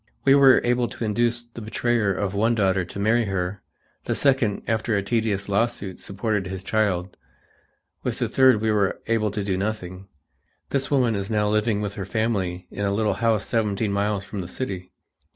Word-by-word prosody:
We 135 Hz, -, +7 dB
were 135 Hz, -2 st, +7 dB
able 120 Hz, 0 st, +1 dB
to 115 Hz, -, -5 dB
induce 120 Hz, +2 st, 0 dB
the 120 Hz, 0 st, -11 dB
betrayer 115 Hz, -1 st, 0 dB
of 95 Hz, 0 st, -2 dB
one 110 Hz, +4 st, +2 dB
daughter 95 Hz, -3 st, +2 dB
to 90 Hz, -, -9 dB
marry 110 Hz, +3 st, +2 dB
her; 95 Hz, -1 st, -3 dB, 0.4 s
the -, -, -1 dB
second, 130 Hz, -7 st, +2 dB
after 110 Hz, -1 st, 0 dB
a 100 Hz, -, -1 dB
tedious 105 Hz, -2 st, -1 dB
lawsuit, 100 Hz, -2 st, -1 dB
supported 100 Hz, -1 st, -2 dB
his 95 Hz, 0 st, -6 dB
child; 95 Hz, -5 st, 0 dB, 0.8 s
with -, -, -3 dB
the -, -, 0 dB
third 130 Hz, -5 st, +4 dB
we 110 Hz, 0 st, +1 dB
were 100 Hz, -2 st, +1 dB
able 115 Hz, -2 st, +1 dB
to 105 Hz, 0 st, -3 dB
do 95 Hz, -2 st, -1 dB
nothing. 95 Hz, -2 st, -4 dB, 0.6 s
This 135 Hz, -1 st, 0 dB
woman 125 Hz, -5 st, +2 dB
is 100 Hz, 0 st, -3 dB
now 105 Hz, -1 st, +1 dB
living 105 Hz, 0 st, +1 dB
with 100 Hz, -2 st, -3 dB
her -, -, -3 dB
family 95 Hz, -5 st, -1 dB
in 100 Hz, -, -4 dB
a 100 Hz, -, +1 dB
little 105 Hz, +1 st, +1 dB
house 110 Hz, -2 st, +2 dB
seventeen 105 Hz, -2 st, 0 dB
miles 100 Hz, 0 st, 0 dB
from 100 Hz, 0 st, -6 dB
the 90 Hz, -, -6 dB
city. 90 Hz, -4 st, -5 dB
105 Hz, 190 wpm, -24 LUFS, 100-115 Hz, 0.8 s, We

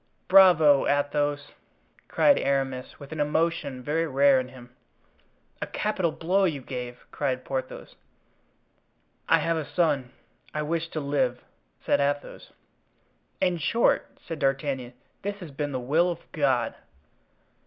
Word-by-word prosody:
"Bravo! 175 Hz, -7 st, +6 dB
Athos!" 145 Hz, 0 st, 0 dB, 0.6 s
cried 285 Hz, -, +4 dB
Aramis, 135 Hz, -2 st, -2 dB
with 140 Hz, +1 st, -11 dB
an 160 Hz, -, -5 dB
emotion 150 Hz, -3 st, -1 dB
very 160 Hz, +4 st, 0 dB
rare 140 Hz, -1 st, +4 dB
in 130 Hz, -, -4 dB
him. 125 Hz, -1 st, -14 dB, 0.9 s
"A -, -, -2 dB
capital 190 Hz, -6 st, -1 dB
blow 185 Hz, +5 st, +1 dB
you 155 Hz, -6 st, -1 dB
gave!" 125 Hz, -2 st, -7 dB
cried 130 Hz, -3 st, -2 dB
Porthos. 130 Hz, -1 st, -5 dB, 1.4 s
"I -, -, +6 dB
have 165 Hz, 0 st, 0 dB
a 160 Hz, -, -2 dB
son. 145 Hz, -8 st, +1 dB, 0.4 s
I 150 Hz, -, -1 dB
wished 165 Hz, +1 st, -2 dB
to 155 Hz, -, -2 dB
live," 135 Hz, -4 st, -1 dB, 0.4 s
said -, -, +2 dB
Athos. 145 Hz, 0 st, -3 dB, 0.9 s
"In 180 Hz, -2 st, +1 dB
short," 195 Hz, +11 st, +1 dB
said 165 Hz, -3 st, -6 dB
D'Artagnan, 135 Hz, -2 st, -1 dB, 0.3 s
"this 205 Hz, +1 st, -3 dB
has 180 Hz, -7 st, -10 dB
been 145 Hz, +1 st, -3 dB
the 130 Hz, -, -2 dB
will 155 Hz, +8 st, +2 dB
of 170 Hz, -1 st, -7 dB
God." 135 Hz, -5 st, +1 dB
145 Hz, 130 wpm, -26 LUFS, 135-165 Hz, 1.4 s, Bravo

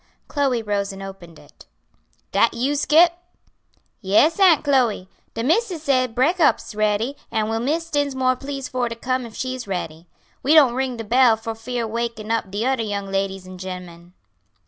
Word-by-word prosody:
Chloe 270 Hz, -5 st, 0 dB
rose 200 Hz, -1 st, -1 dB
and 195 Hz, 0 st, -9 dB
opened 190 Hz, -4 st, -10 dB
it. -, -, -18 dB, 0.6 s
"Dat -, -, +2 dB
you, 260 Hz, +5 st, 0 dB
Scip?" 315 Hz, +4 st, +4 dB, 0.9 s
"Yes, 215 Hz, -, +3 dB
Aunt 360 Hz, -7 st, +5 dB
Chloe; 250 Hz, -10 st, +1 dB, 0.3 s
de 230 Hz, -, -2 dB
missis 345 Hz, -, 0 dB
say 255 Hz, -4 st, +2 dB
breakop's 295 Hz, +8 st, +2 dB
is -, -, -8 dB
ready, 215 Hz, +5 st, 0 dB
an' 220 Hz, -1 st, -1 dB
will 225 Hz, 0 st, -1 dB
Miss 315 Hz, +7 st, -1 dB
Dinsmore 265 Hz, -3 st, +1 dB
please 275 Hz, -1 st, -5 dB
for 250 Hz, -2 st, -2 dB
to 230 Hz, -, -5 dB
come 255 Hz, +1 st, -2 dB
if 220 Hz, -, -14 dB
she's 255 Hz, -3 st, -4 dB
ready. 170 Hz, -3 st, -5 dB, 0.3 s
We 295 Hz, +4 st, +3 dB
don't 275 Hz, -6 st, +6 dB
ring 260 Hz, -1 st, -2 dB
de 225 Hz, -, -5 dB
bell 240 Hz, +1 st, +4 dB
fear 225 Hz, +2 st, -4 dB
wakin' 225 Hz, -1 st, -4 dB
up 225 Hz, -3 st, -1 dB
de 205 Hz, +4 st, -2 dB
odder 260 Hz, -2 st, +1 dB
young 200 Hz, -2 st, -4 dB
ladies 195 Hz, -1 st, -2 dB
an' 185 Hz, 0 st, -10 dB
gemmen." 180 Hz, -2 st, -9 dB
235 Hz, 170 wpm, -22 LUFS, 205-270 Hz, 0.9 s, don't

